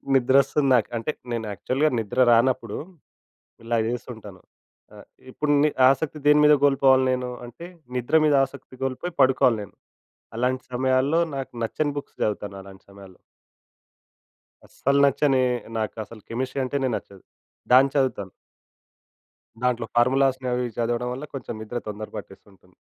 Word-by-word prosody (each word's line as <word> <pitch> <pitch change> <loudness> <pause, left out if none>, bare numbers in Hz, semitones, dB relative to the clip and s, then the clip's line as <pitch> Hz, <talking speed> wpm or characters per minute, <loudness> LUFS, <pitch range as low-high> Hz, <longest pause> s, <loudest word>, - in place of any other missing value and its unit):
నిద్ర 130 0 +3
వస్తుంది 140 +1 -1
నాకు 115 -4 +1
అంటే 115 +7 -2 0.2
నేను 115 -1 -3
యాక్చువల్‌గా 130 +10 0
నిద్ర 115 +4 -4
రానప్పుడు 115 -2 +2 0.9
ఇలా 115 0 0
చేస్తుంటాను. 110 -5 -7 0.5
ఆహ్, - - -14 0.2
ఇప్పుడు 150 +3 -1
ని 150 - +3 0.2
ఆశక్తి 145 +3 -1
దేనిమీద 150 0 +6
కోల్పోవాలి 135 -2 +4
నేను, 125 -1 -2 0.2
అంటే 130 +8 -11 0.3
నిద్ర 125 +6 +2
మీద 150 - +3
ఆశక్తి 130 0 -12
కోల్పోయి 135 +7 -4
పడుకోవాలి 130 -3 +3
నేను. 100 - -12 0.6
అలాంటి 125 +2 -1
సమయాల్లో 130 +5 +2 0.2
నాకు 135 - -5
నచ్చని 145 +6 -2
బుక్స్ - - -10
చదువుతాను 105 -2 -2
అలాంటి 95 0 -15
సమయాల్లో. 100 -2 -14 1.5
అస్సలు 140 +1 0
నచ్చని! 135 -1 +2 0.4
నాకు 110 0 -3
అసలు 110 +1 -13
కెమిస్ట్రీ 130 +3 -3
అంటేనే 135 0 -1
నచ్చదు. 95 -2 -11 0.5
దాన్ని 135 +2 +6
చదువుతాను... 115 -9 0 1.3
దాంట్లో 120 -2 0
ఫార్ములాస్‌ని 130 +1 +2
అవి 125 -2 -2
చదవడం 120 +1 -1
వల్ల 135 +4 -6
కొంచెం 130 -4 -6
నిద్ర 120 +3 -5
తొందర 105 +1 -6
పట్టేస్తుంటుంది. 95 -2 -13
125 Hz, 130 wpm, -24 LUFS, 115-135 Hz, 1.5 s, దేనిమీద